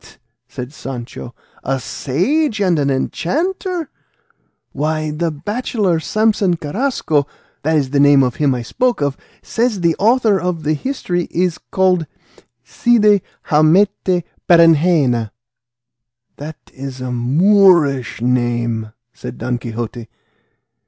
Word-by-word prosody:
said 130 Hz, 0 st, -8 dB
Sancho, 125 Hz, -4 st, -8 dB, 0.3 s
"a 135 Hz, +1 st, -1 dB
sage 220 Hz, -, -1 dB
and 180 Hz, -5 st, +2 dB
an 140 Hz, -1 st, +1 dB
enchanter! 330 Hz, -, -2 dB, 0.8 s
Why, 155 Hz, +1 st, -2 dB
the 165 Hz, +3 st, -1 dB
bachelor 195 Hz, -, -1 dB
Samson 215 Hz, 0 st, +1 dB
Carrasco 160 Hz, -, -1 dB, 0.3 s
(that 160 Hz, +2 st, 0 dB
is 135 Hz, -3 st, -1 dB
the 140 Hz, -, +1 dB
name 140 Hz, -1 st, +6 dB
of 125 Hz, -2 st, -2 dB
him 140 Hz, -3 st, +2 dB
I 120 Hz, -, -4 dB
spoke 250 Hz, -, 0 dB
of) 140 Hz, -2 st, -1 dB, 0.3 s
says 230 Hz, -4 st, -1 dB
the 170 Hz, -2 st, +2 dB
author 220 Hz, -2 st, +3 dB
of 180 Hz, -3 st, -2 dB
the 155 Hz, +1 st, +1 dB
history 175 Hz, -, -2 dB
is 175 Hz, -1 st, -1 dB
called 185 Hz, -4 st, 0 dB, 0.6 s
Cide 210 Hz, -, +3 dB, 0.3 s
Hamete 180 Hz, +3 st, +3 dB, 0.3 s
Berengena." 160 Hz, -8 st, +4 dB, 1.1 s
"That 150 Hz, +1 st, -8 dB, 0.2 s
is 135 Hz, -1 st, -7 dB
a 130 Hz, 0 st, -4 dB
Moorish 145 Hz, -, +3 dB
name," 120 Hz, -3 st, -1 dB, 0.2 s
said -, -, -8 dB
Don 125 Hz, -1 st, -2 dB
Quixote. 115 Hz, 0 st, -6 dB
155 Hz, 115 wpm, -17 LUFS, 135-195 Hz, 1.1 s, name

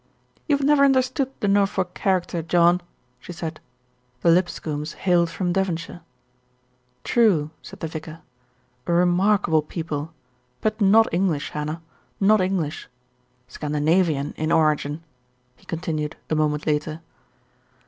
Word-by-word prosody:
"You 290 Hz, -3 st, +3 dB
have 280 Hz, -, -2 dB
never 290 Hz, -1 st, +5 dB
understood 265 Hz, 0 st, +2 dB
the 205 Hz, -, +1 dB
Norfolk 195 Hz, -2 st, +1 dB
character, 180 Hz, -3 st, 0 dB
John," 175 Hz, +2 st, +3 dB, 0.4 s
she 150 Hz, -, -10 dB
said. 165 Hz, -2 st, -6 dB, 0.6 s
The 170 Hz, -, +4 dB
Lipscombes 155 Hz, -4 st, -1 dB
hailed 175 Hz, -2 st, +2 dB
from 175 Hz, 0 st, -2 dB
Devon 190 Hz, -3 st, 0 dB
shire. 170 Hz, +1 st, -10 dB, 1.0 s
"True," 185 Hz, -11 st, +2 dB
said -, -, -12 dB
the 160 Hz, -, -2 dB
vicar. 160 Hz, 0 st, -8 dB, 0.7 s
"A 170 Hz, -, +1 dB
remarkable 180 Hz, -1 st, +3 dB
people; 155 Hz, -1 st, -5 dB, 0.5 s
but 215 Hz, 0 st, -2 dB
not 215 Hz, +3 st, +6 dB
English, 170 Hz, -5 st, 0 dB
Hannah, 155 Hz, +2 st, -4 dB, 0.4 s
not 210 Hz, +1 st, +4 dB
English. 185 Hz, -5 st, -2 dB, 0.6 s
Scandinavian 150 Hz, +2 st, 0 dB
in 155 Hz, +1 st, -1 dB
origin," 155 Hz, -1 st, +1 dB, 0.5 s
he -, -, -25 dB
continued 155 Hz, -3 st, -3 dB, 0.2 s
a -, -, +3 dB
moment 150 Hz, -1 st, 0 dB
later. 155 Hz, +1 st, -1 dB
170 Hz, 125 wpm, -23 LUFS, 155-195 Hz, 1.0 s, not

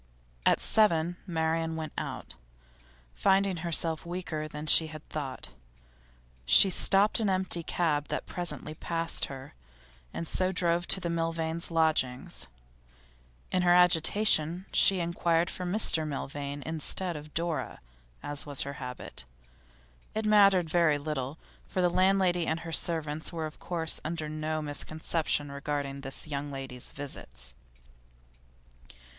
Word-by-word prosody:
At -, -, +4 dB
seven, 175 Hz, -5 st, +2 dB
Marian 160 Hz, -1 st, -1 dB
went 160 Hz, -1 st, -5 dB
out. -, -, -5 dB, 0.8 s
Finding 190 Hz, -, +2 dB
herself 165 Hz, -1 st, 0 dB
weaker 170 Hz, -3 st, -4 dB
than 150 Hz, 0 st, -7 dB
she 160 Hz, +1 st, +6 dB
had 155 Hz, 0 st, -10 dB
thought, 135 Hz, -4 st, -5 dB, 0.9 s
she 125 Hz, -, +6 dB
stopped 200 Hz, +4 st, +4 dB
an 215 Hz, -3 st, +1 dB
empty 185 Hz, -2 st, 0 dB
cab 155 Hz, -3 st, 0 dB
that -, -, -3 dB
presently 175 Hz, -3 st, -4 dB
passed 165 Hz, +1 st, -1 dB
her, 135 Hz, +2 st, -9 dB, 0.6 s
and 165 Hz, -, -5 dB
so 185 Hz, +3 st, 0 dB
drove 170 Hz, -1 st, +1 dB
to 195 Hz, -, +4 dB
the 170 Hz, -2 st, -3 dB
Milvains' 165 Hz, 0 st, +1 dB
lodgings. 130 Hz, -, 0 dB, 1.0 s
In 185 Hz, -, +2 dB
her 175 Hz, 0 st, +5 dB
agitation 180 Hz, 0 st, +3 dB
she 195 Hz, -2 st, +5 dB
inquired 170 Hz, 0 st, +1 dB
for 180 Hz, -, -5 dB
Mr 175 Hz, -5 st, +2 dB
Milvain, 140 Hz, 0 st, -5 dB
instead 165 Hz, +3 st, -2 dB
of 150 Hz, 0 st, -7 dB
for 155 Hz, -, -15 dB
Dora, 165 Hz, -1 st, -2 dB, 0.4 s
as 145 Hz, -1 st, -4 dB
was 145 Hz, -2 st, -2 dB
her 140 Hz, -, -4 dB
habit; 125 Hz, -, -7 dB, 0.9 s
it 220 Hz, 0 st, -1 dB
mattered 200 Hz, -4 st, +5 dB
very 160 Hz, -2 st, +3 dB
little, 145 Hz, -1 st, -4 dB, 0.3 s
for -, -, -4 dB
the 180 Hz, -1 st, +3 dB
landlady 185 Hz, -2 st, +2 dB
and 160 Hz, +1 st, -1 dB
her 165 Hz, -, -7 dB
servants 160 Hz, -2 st, -1 dB
were 165 Hz, -2 st, -3 dB
of 155 Hz, -, -9 dB
course 165 Hz, -3 st, -2 dB
under 160 Hz, -1 st, -3 dB
no 155 Hz, 0 st, -3 dB
misconception 150 Hz, 0 st, -1 dB
regarding 140 Hz, -1 st, -4 dB
this 135 Hz, +2 st, +5 dB
young 145 Hz, -1 st, -4 dB
lady's 135 Hz, -3 st, -6 dB
visits. 65 Hz, -, -7 dB
160 Hz, 135 wpm, -29 LUFS, 150-175 Hz, 1.0 s, she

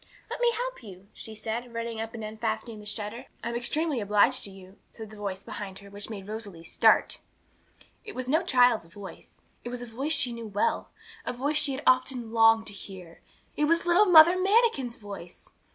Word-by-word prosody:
'Let -, -, -4 dB
me 480 Hz, -1 st, +4 dB
help -, -, -4 dB
you,' 195 Hz, -3 st, -13 dB
she 220 Hz, -, -9 dB
said, 230 Hz, +2 st, -5 dB
running 230 Hz, -1 st, -3 dB
up 225 Hz, +1 st, -6 dB
and 225 Hz, -, -6 dB
unfastening 220 Hz, +1 st, -4 dB
the 210 Hz, -, -8 dB
shutter. 215 Hz, +4 st, -4 dB, 0.2 s
'I'm 235 Hz, -, -3 dB
extremely 275 Hz, +3 st, -1 dB
obliged 210 Hz, +5 st, +3 dB
to -, -, -4 dB
you,' 190 Hz, 0 st, -14 dB
said 220 Hz, -1 st, -10 dB
a -, -, -10 dB
voice 200 Hz, -2 st, -5 dB
behind 195 Hz, -2 st, -7 dB
her 200 Hz, 0 st, -13 dB
which 205 Hz, +1 st, -6 dB
made 200 Hz, -3 st, -7 dB
Rosalie 205 Hz, -6 st, -7 dB
start. 170 Hz, -, +3 dB, 0.8 s
It 425 Hz, -3 st, -9 dB
was 255 Hz, -1 st, -3 dB
no 310 Hz, +5 st, +3 dB
child's 245 Hz, -, +3 dB
voice; 190 Hz, +3 st, -12 dB, 0.3 s
it 240 Hz, -, -5 dB
was 245 Hz, 0 st, -5 dB
a -, -, -6 dB
voice 265 Hz, +7 st, -3 dB
she 250 Hz, -5 st, +1 dB
knew 230 Hz, -1 st, -7 dB
well, 205 Hz, 0 st, -1 dB, 0.3 s
a -, -, -3 dB
voice 285 Hz, +5 st, -1 dB
she 285 Hz, -2 st, +2 dB
had 265 Hz, -, -5 dB
often 255 Hz, -2 st, +2 dB
longed 225 Hz, -1 st, +5 dB
to 205 Hz, -, -3 dB
hear. 185 Hz, -4 st, -11 dB, 0.3 s
It 300 Hz, -, +2 dB
was 335 Hz, +3 st, +2 dB
little 350 Hz, +4 st, +5 dB
Mother 340 Hz, 0 st, +9 dB
Manikin's 380 Hz, -, +2 dB
voice! 200 Hz, -5 st, -10 dB
230 Hz, 200 wpm, -28 LUFS, 205-270 Hz, 0.8 s, Mother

